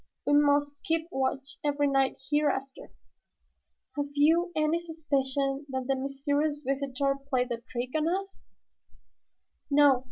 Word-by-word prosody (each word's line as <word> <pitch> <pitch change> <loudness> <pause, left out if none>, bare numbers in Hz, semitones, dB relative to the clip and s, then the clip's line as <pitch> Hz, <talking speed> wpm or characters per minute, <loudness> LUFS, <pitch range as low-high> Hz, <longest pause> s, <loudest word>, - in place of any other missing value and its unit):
"We 290 - +2
must 290 0 +4
keep 325 -3 0
watch 270 0 -2
every 290 0 +1
night 270 -1 +2
hereafter. 280 -2 0 1.1
Have 290 -1 -1
you 330 +5 +4
any 310 +2 +1
suspicion 280 -4 -1
that 260 -1 -3
the 270 +1 +1
mysterious 285 +3 -1
visitor 275 0 0
played 250 -2 +1
the 235 -1 -3
trick 245 0 -3
on 310 0 +2
us?" 390 +3 -3
285 Hz, 120 wpm, -29 LUFS, 270-305 Hz, 1.1 s, must